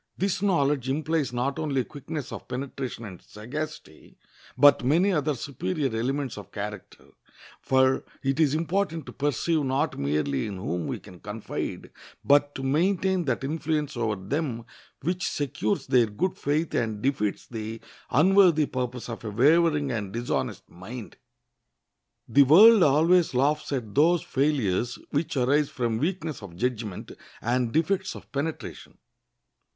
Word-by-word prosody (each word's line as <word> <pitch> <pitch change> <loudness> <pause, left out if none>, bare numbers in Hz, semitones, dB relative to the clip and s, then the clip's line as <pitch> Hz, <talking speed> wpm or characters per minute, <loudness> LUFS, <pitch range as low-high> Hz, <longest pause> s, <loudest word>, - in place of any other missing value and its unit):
This 195 0 -1
knowledge 145 -9 +1
implies 155 0 0
not 130 +5 -2
only 140 -5 0
quickness 145 +1 -7
of - - -8
penetration 130 -2 -5
and 95 -4 -10
sagacity, 135 - -8 0.4
but 145 0 +6
many 170 +10 +3
other 150 -4 0
superior 140 0 -3
elements 135 +3 -2
of - - -12
character; - - -7 0.5
for 130 0 +3 0.2
it 135 +2 0
is 150 -2 +3
important 165 -1 -1
to - - -9
perceive 145 +3 0
not 135 +2 -1
merely 70 -1 0
in 100 -2 -6
whom 90 -2 -3
we - - -3
can 90 - -14
confide, 105 +3 -5 0.3
but 145 0 +4
to 135 - -5
maintain 180 +5 +1
that - - -1
influence 150 0 -2
over 110 -3 0
them 115 - -3 0.4
which 175 +4 -1
secures 130 -7 -2
their 125 -4 +4
good 160 - -2
faith 150 +3 -1
and 110 -3 -1
defeats 115 -7 -1
the 110 -1 -6 0.3
unworthy 175 +1 +5
purpose 125 -2 -4
of 115 -1 -7
a 110 - -4
wavering 150 +5 +3
and 100 -5 -4
dishonest 120 +1 -3
mind. 110 +6 -9 1.1
The 140 - +5
world 200 - +8
always 160 +1 +4
laughs 145 +5 +1
at 120 -7 -3
those 165 +4 +4
failures 125 -6 0
which 145 -1 -1
arise 140 +3 +2
from 120 -4 -2
weakness 160 -3 -2
of 95 -4 -10
judgment 110 -2 -3 0.3
and 120 0 0
defects 190 +5 0
of - - -12
penetration. 150 +3 -5
140 Hz, 140 wpm, -26 LUFS, 120-155 Hz, 1.1 s, world